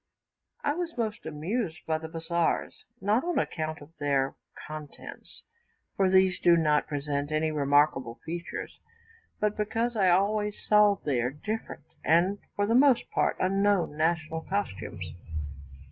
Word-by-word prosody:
I 290 Hz, -, +2 dB
was 335 Hz, -1 st, -4 dB
most 220 Hz, -7 st, -3 dB
amused 165 Hz, +4 st, -3 dB
by 160 Hz, -1 st, 0 dB
the 160 Hz, -, -6 dB
bazaars, 165 Hz, +1 st, -1 dB
not 210 Hz, +5 st, +2 dB
on 350 Hz, 0 st, -1 dB
account 155 Hz, -2 st, -2 dB
of 155 Hz, +3 st, -14 dB
their 140 Hz, -2 st, +1 dB, 0.3 s
contents, 155 Hz, -2 st, -10 dB, 0.5 s
for 195 Hz, -1 st, +3 dB
these 190 Hz, -1 st, +4 dB
do 170 Hz, -1 st, +5 dB
not 150 Hz, -2 st, +2 dB
present 145 Hz, 0 st, -2 dB
any 155 Hz, +1 st, +1 dB
remarkable 145 Hz, -4 st, +2 dB
features, 170 Hz, +2 st, -6 dB, 0.6 s
but 210 Hz, 0 st, +1 dB
because 225 Hz, +3 st, -1 dB
I 195 Hz, -4 st, +4 dB
always 205 Hz, +3 st, +2 dB
saw 210 Hz, -1 st, +6 dB
there 125 Hz, -4 st, +1 dB
different, 160 Hz, -, -5 dB, 0.2 s
and 180 Hz, +5 st, +3 dB, 0.2 s
for 205 Hz, -, +1 dB
the 225 Hz, -, +1 dB
most 260 Hz, 0 st, +4 dB
part -, -, +1 dB
unknown, 195 Hz, -3 st, +2 dB
national 160 Hz, 0 st, 0 dB
costumes. 100 Hz, -, -3 dB
170 Hz, 135 wpm, -28 LUFS, 150-205 Hz, 0.6 s, saw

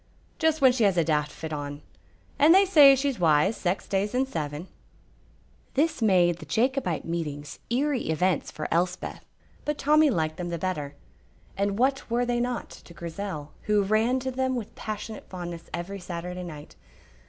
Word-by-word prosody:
"Just 320 Hz, -2 st, +2 dB
when 260 Hz, -2 st, +7 dB
she 245 Hz, -2 st, 0 dB
has 195 Hz, -3 st, +2 dB
a 170 Hz, -, +4 dB
daft 150 Hz, -2 st, 0 dB
fit 160 Hz, -1 st, -7 dB
on, 145 Hz, 0 st, -5 dB, 0.6 s
and 315 Hz, +5 st, +7 dB
they 390 Hz, +1 st, +6 dB
say 295 Hz, -7 st, +8 dB
she's 270 Hz, -4 st, -1 dB
wise 165 Hz, +5 st, +3 dB
sax 180 Hz, +1 st, -2 dB
days 200 Hz, +4 st, -1 dB
in 260 Hz, +1 st, +2 dB
seven." 155 Hz, -, -5 dB, 1.1 s
This 300 Hz, -1 st, +1 dB
made 180 Hz, -5 st, +4 dB
the 155 Hz, -, -9 dB
Jacobite 230 Hz, -, 0 dB
meetings 150 Hz, -4 st, -4 dB
eerie 260 Hz, -, 0 dB
events 175 Hz, +2 st, +1 dB
for 155 Hz, -, -5 dB
Elspeth, 180 Hz, +2 st, -1 dB, 0.4 s
but 295 Hz, 0 st, -2 dB
Tommy 305 Hz, +1 st, +4 dB
liked 160 Hz, -, -1 dB
them 175 Hz, -1 st, -4 dB
the 170 Hz, -, -2 dB
better; 155 Hz, -5 st, -3 dB, 0.6 s
and 200 Hz, 0 st, -1 dB
what 265 Hz, +2 st, +1 dB
were 240 Hz, +1 st, +1 dB
they 240 Hz, 0 st, 0 dB
not 245 Hz, 0 st, -2 dB
to 170 Hz, -, -14 dB
Grizel, 170 Hz, -3 st, -6 dB
who 210 Hz, -1 st, +3 dB
ran 220 Hz, +6 st, +2 dB
to 260 Hz, 0 st, -3 dB
them 260 Hz, 0 st, -1 dB
with 230 Hz, -4 st, -5 dB
passionate 215 Hz, 0 st, -6 dB
fondness 175 Hz, -2 st, -7 dB
every 195 Hz, +3 st, -5 dB
Saturday 180 Hz, 0 st, -6 dB
night? 150 Hz, -4 st, -9 dB
195 Hz, 170 wpm, -26 LUFS, 165-255 Hz, 1.1 s, say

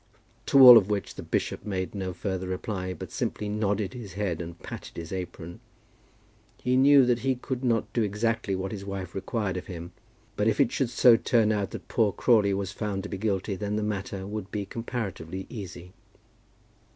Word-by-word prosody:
To 140 Hz, -, +5 dB
all 125 Hz, -3 st, +12 dB
of 100 Hz, -1 st, -5 dB
which 105 Hz, -2 st, -2 dB
the -, -, -8 dB
bishop -, -, -2 dB
made 95 Hz, -3 st, -3 dB
no 95 Hz, -2 st, -3 dB
further 95 Hz, 0 st, -4 dB
reply, 95 Hz, 0 st, -3 dB
but -, -, -8 dB
simply 105 Hz, -, -3 dB
nodded 105 Hz, -1 st, -1 dB
his 115 Hz, -7 st, -8 dB
head 90 Hz, -4 st, -2 dB
and 85 Hz, 0 st, -7 dB
patted -, -, -9 dB
his 85 Hz, -1 st, -6 dB
apron. 85 Hz, -2 st, -6 dB, 1.0 s
He 125 Hz, 0 st, +1 dB
knew 135 Hz, 0 st, +7 dB
that 120 Hz, -1 st, +2 dB
he 130 Hz, +1 st, 0 dB
could 125 Hz, +1 st, -5 dB
not 115 Hz, -3 st, 0 dB
do 120 Hz, -, +1 dB
exactly 105 Hz, -1 st, 0 dB
what 95 Hz, +1 st, -3 dB
his 100 Hz, -3 st, -6 dB
wife 100 Hz, -1 st, -6 dB
required 95 Hz, -1 st, -2 dB
of 90 Hz, -, -6 dB
him; 85 Hz, -1 st, -7 dB, 0.4 s
but 105 Hz, +1 st, +1 dB
if 110 Hz, -, +1 dB
it 135 Hz, -4 st, +4 dB
should 135 Hz, -4 st, 0 dB
so 120 Hz, -1 st, +6 dB
turn 115 Hz, -3 st, +2 dB
out 100 Hz, -3 st, -1 dB
that -, -, -9 dB
poor 110 Hz, -3 st, +2 dB
Crawley 105 Hz, +1 st, +3 dB
was 100 Hz, 0 st, -3 dB
found 100 Hz, -2 st, -3 dB
to 105 Hz, -, -6 dB
be -, -, -4 dB
guilty, 100 Hz, -1 st, -1 dB
then 105 Hz, +2 st, -3 dB
the 105 Hz, -, -1 dB
matter 100 Hz, -2 st, -3 dB
would 105 Hz, -1 st, -5 dB
be 105 Hz, -2 st, -3 dB
comparatively 95 Hz, -6 st, -5 dB
easy. 90 Hz, -5 st, -8 dB
100 Hz, 195 wpm, -27 LUFS, 95-115 Hz, 1.0 s, all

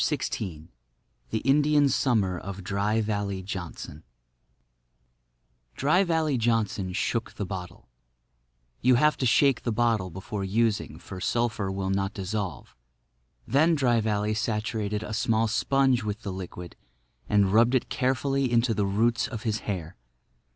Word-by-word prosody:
XVI 80 Hz, -6 st, -2 dB, 0.6 s
THE 110 Hz, -, -2 dB
INDIAN 145 Hz, +1 st, +4 dB
SUMMER 105 Hz, -9 st, +1 dB
OF 100 Hz, 0 st, -7 dB
DRY 105 Hz, +3 st, 0 dB
VALLEY 100 Hz, -3 st, -2 dB
JOHNSON 90 Hz, -5 st, -7 dB, 1.7 s
Dry 155 Hz, +8 st, +3 dB
Valley 160 Hz, -6 st, +1 dB
Johnson 110 Hz, -5 st, 0 dB
shook 115 Hz, +4 st, -2 dB
the 100 Hz, -, -4 dB
bottle. 90 Hz, -2 st, -7 dB, 0.9 s
You 125 Hz, +1 st, +5 dB
have 150 Hz, +5 st, +4 dB
to 130 Hz, -, +1 dB
shake 135 Hz, +2 st, +4 dB
the 120 Hz, -, -2 dB
bottle 110 Hz, -4 st, +1 dB
before 95 Hz, +3 st, -5 dB
using; 110 Hz, +2 st, 0 dB
for 95 Hz, -2 st, -9 dB
sulphur 115 Hz, -4 st, 0 dB
will 95 Hz, 0 st, -2 dB
not 95 Hz, +1 st, -1 dB
dissolve. 95 Hz, -, -4 dB, 0.7 s
Then 155 Hz, +6 st, +4 dB
Dry 120 Hz, -5 st, +2 dB
Valley 105 Hz, 0 st, 0 dB
saturated 105 Hz, -1 st, -2 dB
a 105 Hz, -, -6 dB
small 110 Hz, 0 st, +1 dB
sponge 130 Hz, +2 st, +2 dB
with 105 Hz, +2 st, -4 dB
the 100 Hz, -, -4 dB
liquid 90 Hz, -2 st, -8 dB, 0.5 s
and 100 Hz, -2 st, +3 dB
rubbed 120 Hz, +4 st, +5 dB
it 125 Hz, -, 0 dB
carefully 135 Hz, 0 st, 0 dB
into 120 Hz, 0 st, +3 dB
the 105 Hz, -2 st, 0 dB
roots 115 Hz, +3 st, +1 dB
of 115 Hz, -4 st, -7 dB
his 110 Hz, -2 st, -1 dB
hair. 85 Hz, -5 st, -4 dB
110 Hz, 135 wpm, -27 LUFS, 100-120 Hz, 1.7 s, You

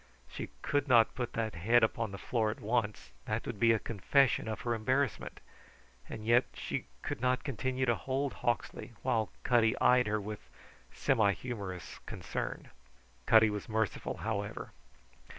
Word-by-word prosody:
She -, -, -6 dB
could 145 Hz, 0 st, 0 dB
not 120 Hz, -3 st, +5 dB
put 125 Hz, -2 st, -4 dB
that 110 Hz, -1 st, -2 dB
head 110 Hz, +8 st, +3 dB
upon 110 Hz, 0 st, +1 dB
the 100 Hz, -, -6 dB
floor 110 Hz, +2 st, 0 dB
at 110 Hz, -, -5 dB
once; 105 Hz, -, -1 dB
that -, -, -2 dB
would 100 Hz, -, -5 dB
be 115 Hz, +1 st, +5 dB
a 115 Hz, -, +4 dB
confession 115 Hz, +4 st, +2 dB
of 110 Hz, -, -4 dB
her 120 Hz, -, 0 dB
embarrassment; 130 Hz, +2 st, -1 dB, 0.7 s
and 110 Hz, -1 st, -7 dB
yet 120 Hz, +3 st, +5 dB
she -, -, -4 dB, 0.2 s
could -, -, -4 dB
not 125 Hz, 0 st, +1 dB
continue 130 Hz, 0 st, -1 dB
to 120 Hz, -, +3 dB
hold 135 Hz, +3 st, -2 dB
Hawksley 120 Hz, 0 st, -2 dB
while 115 Hz, -4 st, +1 dB
Cutty 120 Hz, -1 st, +3 dB
eyed 125 Hz, -1 st, +5 dB
her 105 Hz, 0 st, 0 dB
with 105 Hz, +1 st, -6 dB, 0.5 s
semi 110 Hz, -7 st, +2 dB
humorous 100 Hz, -5 st, -6 dB
concern. -, -, -5 dB, 0.6 s
Cutty 110 Hz, -1 st, +6 dB
was 105 Hz, +1 st, -5 dB
merciful, 110 Hz, -1 st, -1 dB
however. 105 Hz, -1 st, -3 dB
115 Hz, 155 wpm, -32 LUFS, 105-125 Hz, 0.7 s, Cutty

